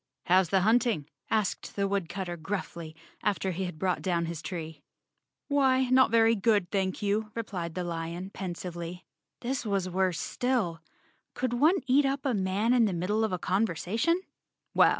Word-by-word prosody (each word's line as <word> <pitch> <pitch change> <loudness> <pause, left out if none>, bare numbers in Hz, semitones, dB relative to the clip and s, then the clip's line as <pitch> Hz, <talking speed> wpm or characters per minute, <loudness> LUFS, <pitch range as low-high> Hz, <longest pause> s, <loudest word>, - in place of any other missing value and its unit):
"How's 185 -1 +4
the 190 +1 +3
hunting?" 220 - +2 0.2
asked 215 -3 -1
the 200 -1 +1
woodcutter 190 -2 -2
gruffly, 170 -2 -5 0.3
after 195 -2 0
he 185 +2 -2
had 180 -3 -6
brought 180 +2 0
down 170 -3 0
his 165 -1 -5
tree. 160 -3 -6 0.7
"Why, 265 -3 +3
not 260 0 +6
very 225 0 +5
good, 205 -4 +2
thank 190 0 -1
you," 210 +1 0
replied 180 -8 -4
the 180 - -2
lion 170 +2 -4
pensively. 175 -2 -6 0.4
This 255 +1 -2
was 200 -4 0
worse 185 -1 0
still. 225 -11 -1 0.5
Could 255 -2 -1
one 310 +10 +4
eat 275 +2 +4
up 275 +1 -2
a 265 - +2
man 200 +4 +1
in 240 -2 +5
the 200 - 0
middle 195 +6 0
of 220 - 0
a 180 - 0
conversation? 205 - +1
195 Hz, 160 wpm, -29 LUFS, 175-230 Hz, 0.7 s, not